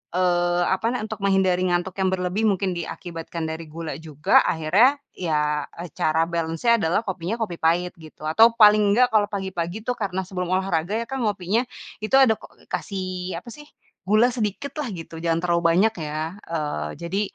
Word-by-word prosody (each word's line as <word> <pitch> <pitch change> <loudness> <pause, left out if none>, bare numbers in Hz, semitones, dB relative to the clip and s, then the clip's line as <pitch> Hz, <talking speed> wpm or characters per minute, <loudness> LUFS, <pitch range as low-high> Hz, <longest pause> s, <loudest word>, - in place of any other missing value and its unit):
eee, 175 -1 +2
apa, 190 +4 0
nah 250 - -2
untuk 220 -1 -6
menghindari 190 -2 +2
ngantuk 175 +1 -1
yang 190 - +2
berlebih 185 +4 0
mungkin 195 -2 +1
diakibatkan 170 -1 -6
dari 160 +1 -5
gula 165 0 -6
juga 155 -2 +3
akhirnya 190 - +4 0.2
ya, 150 -4 0
eee, 170 0 -7
cara 160 +1 +2
balance-nya 170 +8 +1
adalah 175 +4 +1
kopinya, 185 +1 -3
kopi 180 -6 -3
pahit 175 +2 +2
gitu 155 -1 -14
atau 225 +8 +6
paling 210 -2 +7
enggak 250 +2 +4
kalau 210 -2 +4
pagi-pagi 190 -1 -4
itu 250 - -1
karena 190 -3 -2
sebelum 180 -2 -3
olahraga 185 -1 0
ya - - -4
kan 270 - -3
ngopinya 205 +4 0 0.4
itu 215 - -4
ada 260 -5 +6
ko - - -12 0.3
kasih 185 -2 -4
apa 235 - -12
sih, 295 0 -12 0.4
gula 215 +5 +4
sedikit 230 +3 -3
lah 290 - -2
gitu 165 -1 -8
jangan 165 0 0
terlalu 170 -1 +1
banyak 220 +4 +4
ya, 155 +5 -4
eee, 150 - -2
jadi 185 +4 -1
180 Hz, 175 wpm, -23 LUFS, 165-210 Hz, 0.4 s, paling